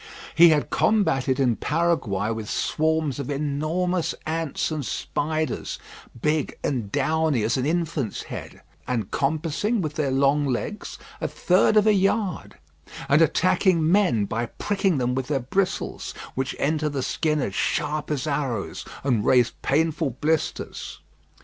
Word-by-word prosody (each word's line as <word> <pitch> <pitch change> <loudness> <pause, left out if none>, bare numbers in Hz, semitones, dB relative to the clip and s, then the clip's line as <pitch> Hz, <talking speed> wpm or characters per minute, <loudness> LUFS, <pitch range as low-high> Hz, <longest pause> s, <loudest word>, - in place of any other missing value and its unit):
He 170 +1 +8
had 150 -2 +1
combated 135 -11 +2
in 125 -4 +2
Paraguay 140 - 0
with 110 -1 -4
swarms 155 -3 0
of 140 - -4
enormous 155 +5 -1
ants 160 -1 -2
and 155 -2 -2
spiders, 155 +5 -2 0.4
big 150 +3 0
and 115 -8 -2
downy 150 -2 +1
as 110 - +1
an 130 +1 0
infant's 160 -7 -1
head, - - -8 0.3
and 115 -6 -2
compassing 160 - 0
with 155 -5 -2
their 150 -2 -1
long 140 +2 +2
legs 135 - -3 0.2
a - - 0
third 185 +4 +3
of 210 - +5
a 215 - +5
yard, 195 -1 0 0.5
and 145 +3 +4
attacking 165 0 +3
men 175 - +3
by 115 +4 -2
pricking 195 - 0
them 125 -1 0
with 130 0 -2
their 145 -2 0
bristles, 180 +10 -2 0.2
which 130 +1 -2
enter 155 +1 0
the 140 -3 -3
skin 155 +1 0
as 100 -8 -2
sharp 150 +5 -1
as 150 -3 -1
arrows, 140 -8 -2 0.2
and 120 -6 +1
raise 125 -1 +4
painful 150 -3 0
blisters. 155 0 -2
150 Hz, 145 wpm, -24 LUFS, 130-165 Hz, 0.5 s, He